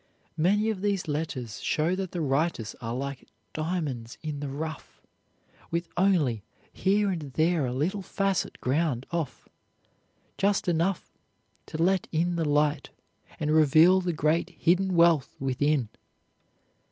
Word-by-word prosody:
Many 205 +7 +2
of 195 -4 -5
these 200 -3 0
letters 145 -7 -4
show 160 +3 +1
that 190 -1 -3
the 175 - -3
writers 140 -5 0
are 115 0 -3
like 140 +1 -5 0.3
diamonds 155 -8 -3
in 150 -2 -4
the 145 -1 -4
rough, 155 +2 -6 0.7
with 170 0 -2
only 170 - +2 0.3
here 200 +1 +2
and 155 -6 -5
there 160 -2 +2
a - - -2
little 165 +11 -1
facet 195 0 -1
ground 135 -2 0
off, 165 -5 -4 0.9
just 200 0 +1
enough 175 +2 0 0.5
to - - -6
let 185 +3 +2
in 170 +2 +1
the 165 -3 0
light 150 +1 +1 0.5
and 150 0 0
reveal 160 +4 +6
the 180 -1 -1
great 155 +1 +1
hidden 185 +2 +2
wealth 170 -5 +4
within. 135 0 +1
160 Hz, 135 wpm, -27 LUFS, 145-180 Hz, 0.9 s, reveal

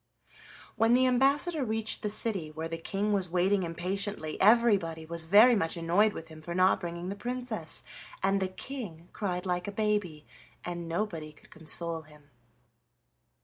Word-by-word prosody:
When 225 +2 +4
the 260 +1 +4
ambassador 275 +5 +3
reached 220 -2 -2
the 210 - -1
city, 205 -6 0
where 160 +1 -5
the 165 0 -5
King 200 +5 -1
was 190 -3 0
waiting 185 +3 +2
impatiently, 180 0 -3
everybody 200 -7 +4
was 165 0 -2
very 210 +8 +7
much 165 -4 0
annoyed 180 +6 +2
with 165 - -8
him 155 -1 -12
for 170 +2 -6
not 185 +1 +4
bringing 170 0 -5
the 200 - -4
Princess, 240 -6 -3 0.4
and 195 +1 +2
the 190 - +1
King 185 -5 -8
cried 180 -3 -3
like 180 0 -1
a - - -3
baby, 205 -7 -1 0.4
and 175 -1 -5
nobody 165 -4 -3
could 150 - -20
console 165 +1 0
him. 150 -2 -19
185 Hz, 160 wpm, -29 LUFS, 165-215 Hz, 0.4 s, very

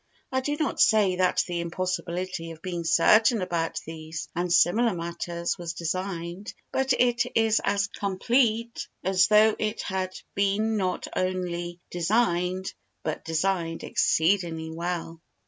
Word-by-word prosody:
I 260 0 +1
do 290 +3 -2
not 310 -3 0
say 210 -5 +4
that 185 0 +2
the 175 -1 -3
impossibility 180 0 -3
of 165 -1 -11
being 175 -2 -3
certain 220 +8 +5
about 170 -3 -2
these 160 0 -7
and 175 +1 -1
similar 205 +5 +4
matters 170 +1 -3
was 170 0 -5
designed, 175 +2 -4 0.2
but 265 0 +1
it 245 -1 +2
is 225 0 +3
as 200 0 +1
complete 230 +4 0 0.2
as 185 0 +4
though 215 0 +5
it 215 +1 -2
had 185 -1 -3 0.2
been 200 +3 +1
not 185 -3 -1
only 175 -1 -2
designed 180 -1 0 0.3
but 155 - -3
designed 165 0 -1
exceedingly 165 -2 +1
well. 165 0 -4
185 Hz, 130 wpm, -26 LUFS, 170-210 Hz, 0.3 s, certain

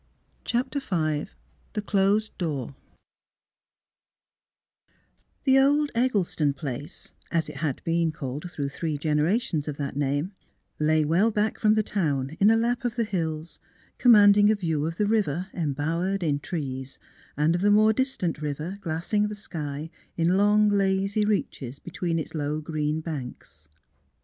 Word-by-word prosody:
CHAPTER 250 +4 -1
V 155 - -1 0.5
THE 210 - -2
CLOSED 205 +1 +1
DOOR 145 -7 -3 2.7
The 270 -1 +5
old 290 +2 +3
Eggleston 195 - +1
place, 140 +1 -7 0.2
as 165 -1 +1
it - - -8
had 145 -5 -2
been 165 -1 +1
called 145 +3 -6
through 145 -5 -3
three 155 +1 -3
generations 155 +3 0
of 145 -2 -4
that 140 -2 -4
name, 145 +5 -1 0.5
lay 155 0 +3
well 175 +9 +3
back 215 0 -1
from 215 -1 +4
the 215 - +2
town 145 -8 -1
in 200 - +6
a 225 - +5
lap 240 +2 0
of 240 -1 -2
the 235 - +1
hills, 165 -5 -3 0.4
command 210 -4 +7
ing 205 0 +6
a 215 - +4
view 160 -6 -1
of 165 +1 -5
the 210 - +2
village 195 -6 +1
embowered 165 +5 -1
in 145 -3 +1
trees 135 -5 -5 0.4
and 150 +3 +3
of 175 - -1
the 205 - +4
more 215 +1 +5
distant 210 - -1
river 155 +6 -4
glassing 175 +5 0
the 210 - -5
sky 155 -5 -5 0.3
in 170 +2 +2
long, 210 +1 +4
lazy 195 +1 +1
reaches 140 - -2
between 170 +1 -3
its 160 - -4
low 150 -1 -2
green 155 0 -2
banks. 125 - -8
170 Hz, 150 wpm, -26 LUFS, 150-210 Hz, 2.7 s, command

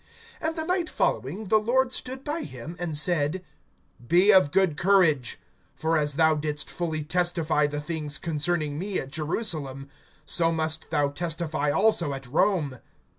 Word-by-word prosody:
(11)And 320 -1 -1
the 320 - -2
night 360 -1 0
following, 185 +10 -1
the 215 - +5
Lord 250 +4 +1
stood 260 +1 -4
by 305 +3 -3
him, 135 +5 -8
and 165 -4 -2
said: 170 +2 0 0.6
Be 185 - +5
of 185 -7 +6
good 185 -1 +2
courage; 170 - +3 0.4
for 160 +1 0
as 145 -2 0
thou 160 0 +4
didst 150 0 -2
fully 160 -3 -3
testify 165 -2 +1
the 145 0 -4
things 150 -2 -4
concerning 155 -2 -1
me 195 +1 -2
at 135 - -5
Jerusalem, 150 - -2 0.4
so 165 +3 +2
must 160 -1 -2
thou 145 -3 +1
testify 160 -1 -2
also 170 -4 +2
at 135 0 -7
Rome. 150 - +1
160 Hz, 155 wpm, -26 LUFS, 150-190 Hz, 0.6 s, of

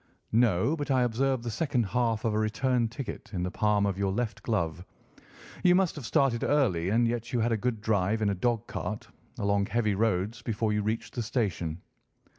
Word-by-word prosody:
"No, 115 - +3
but 145 -2 -4
I 130 -2 +3
observe 125 +1 0
the 120 - -3
second 130 0 0
half 115 +2 0
of 110 - +1
a 105 - +1
return 120 +2 +1
ticket 120 +3 -7
in 90 - -1
the 90 - -2
palm 105 -1 +2
of 100 -1 -1
your 100 -1 +1
left 110 +2 -2
glove. 90 -6 -1 0.8
You 180 -1 +6
must 185 -2 +2
have 140 -6 -6
started 125 -4 +2
early, 95 - +2
and 115 +3 +3
yet 120 0 -3
you 125 - 0
had 120 +2 +1
a - - +3
good 115 0 -2
drive 110 0 +1
in 105 - +2
a - - 0
dog 115 +3 0
cart, - - -5 0.3
along 100 0 +1
heavy 110 -1 +1
roads, 105 +1 0
before 110 -1 -1
you 105 - +1
reached 110 +3 -3
the 120 - -2
station." 100 -8 -2
110 Hz, 205 wpm, -28 LUFS, 100-120 Hz, 0.8 s, You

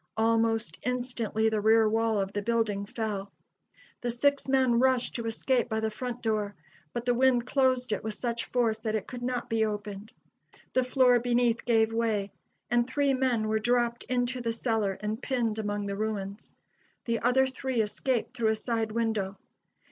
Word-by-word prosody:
Almost 225 0 +1
instantly 245 -3 -1
the 220 -1 +1
rear 220 +1 +5
wall 225 0 +1
of 195 0 -2
the 205 - -1
building 210 -2 0
fell. 205 -3 -4 0.7
The 245 - -2
six 280 +5 +1
men 260 -3 +3
rushed 255 -1 +2
to 230 -1 -3
escape 240 +2 0
by 220 - 0
the 220 0 -1
front 245 +2 -5
door, 210 -3 -1 0.4
but 240 0 -4
the 245 - +3
wind 245 -1 +3
closed 255 -2 +1
it 210 - -1
with 220 -1 -3
such 235 0 -3
force 230 -3 0
that 220 -1 -2
it 210 - -2
could 245 -1 -8
not 245 0 -2
be 225 -1 +1
opened. 210 -1 -4 0.6
The 255 - +3
floor 255 -1 +4
beneath 240 -1 +1
gave 225 -2 +3
way, 220 -3 0 0.4
and 240 0 +3
three 280 +1 +1
men 255 -4 +1
were 220 0 +1
dropped 240 +1 +1
into 250 0 -1
the 230 -1 -1
cellar 225 -4 0
and 215 +1 -3
pinned 230 -5 -1
among 205 -1 -2
the 200 0 -3
ruins. 205 -1 -4 0.5
The 230 -1 0
other 250 +3 +3
three 260 -1 -3
escaped 240 +3 -1
through 230 -3 +1
a 220 - +2
side 225 0 -2
window. 220 -4 -1
230 Hz, 180 wpm, -28 LUFS, 215-245 Hz, 0.7 s, rear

